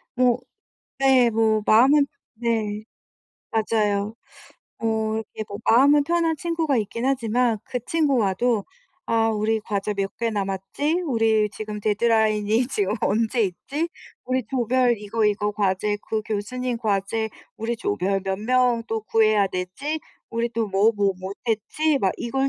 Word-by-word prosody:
뭐 250 -1 +3 0.6
네. 265 -3 +5
뭐 220 -1 +2
마음은 275 +6 +6 0.3
네. 220 -2 -2 0.7
맞아요. 215 -2 0 0.6
어 220 -1 0
이게 215 - -4
뭐 200 - -6
마음은 285 +5 +5
편한 330 0 +1
친구가 325 -3 0
있긴 230 +3 -3
하지만 245 -3 +1
그 250 - -3
친구와도 245 - +1 0.4
"아 225 0 +2
우리 220 +1 0
과제 210 0 -2
몇 195 -1 -3
개 230 -1 -1
남았지?", 205 - -1
"우리 225 -5 +2
지금 210 0 -6
데드라인이 215 +1 +2
지금 205 -5 0
언제 225 +3 +1
있지?", 270 - -2 0.4
"우리 255 0 -1
조별 250 -1 +2
이거, 210 +2 -1
이거 210 0 +1
과제 205 0 0
그 220 -1 -1
교수님 235 +4 -3
과제 220 0 -1 0.3
우리 230 +2 -2
조별 195 - -1
몇 190 0 -2
명 245 +1 +2
또 225 -1 -2
구해야 215 -2 +3
되지?", 235 +13 -3 0.3
"우리 230 +1 -1
또 225 -1 -1
뭐, 200 +3 +3
뭐 200 -1 +2
못 190 +2 -6
했지?" 285 +7 +1
막 195 -6 +1
이걸 270 +3 -1
225 Hz, 255 characters per minute, -23 LUFS, 210-250 Hz, 0.7 s, 마음은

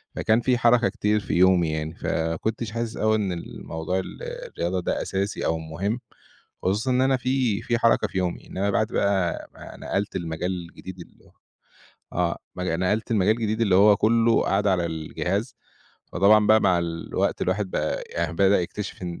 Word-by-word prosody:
فكان 110 +2 +2
في 125 0 +2
حركة 120 -3 +4
كتير 105 0 0
في 100 - -5
يومي 90 -2 +4
يعني، 80 0 -3
ف - - -10
ما 80 0 0
كُنتِش 110 +5 -3
حاسِس 115 0 -4
أوي 110 0 +2
إن 100 -4 -1
ال 85 - -7
موضوع 80 +3 -2
ال 95 - -8
الرياضة 90 +2 -3
دا - - -1
أساسي 100 +1 -2
أو 80 - +1
مُهم، 95 +9 -3 0.6
خصوصًا 105 +7 0
إن 125 +1 +2
أنا 130 0 +3
في 125 -4 0
في 120 - 0
حركة 115 -1 +3
في 95 - -6
يومي، 90 -2 -2
إنما 100 +2 -2
بعد 110 +1 +1
بَقى 95 -4 0
ما - - -11
نقلت 100 +1 -3
المجال 85 +1 -3 0.2
الجديد 95 +1 -10
اللي - - -17 0.8
آه، 85 -1 0 0.2
مج 90 0 -3
نقلت 95 +7 0
لمجال 105 +1 +3
الجديد 110 -1 -2
اللي 100 -5 +3
هو 100 +2 +6
كُلّه 115 +2 +3
قعدة 100 0 +2
على 90 -2 +1
الجهاز، 90 +8 -3 0.6
فطبعًا 105 +3 +5
بَقى 110 0 +6
مع 90 -3 +3
الوقت 85 -1 -2
الواحد 95 +1 -1
بَقى - - -1
يعني - - -2
بدأ 100 +1 +4
يكتشف 100 +2 -6
إن 85 -1 -5
100 Hz, 180 wpm, -24 LUFS, 90-110 Hz, 0.8 s, هو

